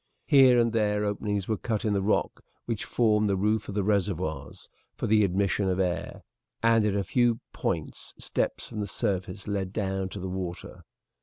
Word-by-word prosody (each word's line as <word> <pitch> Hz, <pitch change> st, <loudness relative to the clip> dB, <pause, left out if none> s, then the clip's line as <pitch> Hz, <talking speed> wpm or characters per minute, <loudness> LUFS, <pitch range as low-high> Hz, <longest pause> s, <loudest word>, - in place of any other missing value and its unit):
Here 130 Hz, -4 st, +6 dB
and 115 Hz, -1 st, +2 dB
there 105 Hz, -2 st, +1 dB
openings 105 Hz, -1 st, -2 dB
were 110 Hz, -, 0 dB
cut 110 Hz, 0 st, -2 dB
in 105 Hz, -, +2 dB
the 100 Hz, -, +1 dB
rock 105 Hz, +2 st, 0 dB, 0.2 s
which 115 Hz, -3 st, -3 dB
formed 105 Hz, -3 st, +2 dB
the 100 Hz, -, +2 dB
roof 105 Hz, +2 st, 0 dB
of 100 Hz, -, -5 dB
the 100 Hz, -, +1 dB
reservoirs, 95 Hz, -8 st, -2 dB, 0.3 s
for -, -, -3 dB
the 105 Hz, 0 st, +4 dB
admission 100 Hz, +1 st, +1 dB
of 90 Hz, 0 st, 0 dB
air, 90 Hz, -1 st, -2 dB, 0.4 s
and 115 Hz, -1 st, +4 dB
at 100 Hz, -, 0 dB
a 100 Hz, -, +1 dB
few 120 Hz, +3 st, +2 dB
points -, -, -3 dB
steps -, -, -2 dB
from 110 Hz, -, -6 dB
the 105 Hz, -, -2 dB
surface 95 Hz, 0 st, -2 dB
led 100 Hz, -2 st, -2 dB
down 95 Hz, -2 st, -2 dB
to 100 Hz, -, -7 dB
the 95 Hz, -, -4 dB
water. 90 Hz, -2 st, -6 dB
100 Hz, 185 wpm, -27 LUFS, 95-110 Hz, 0.4 s, Here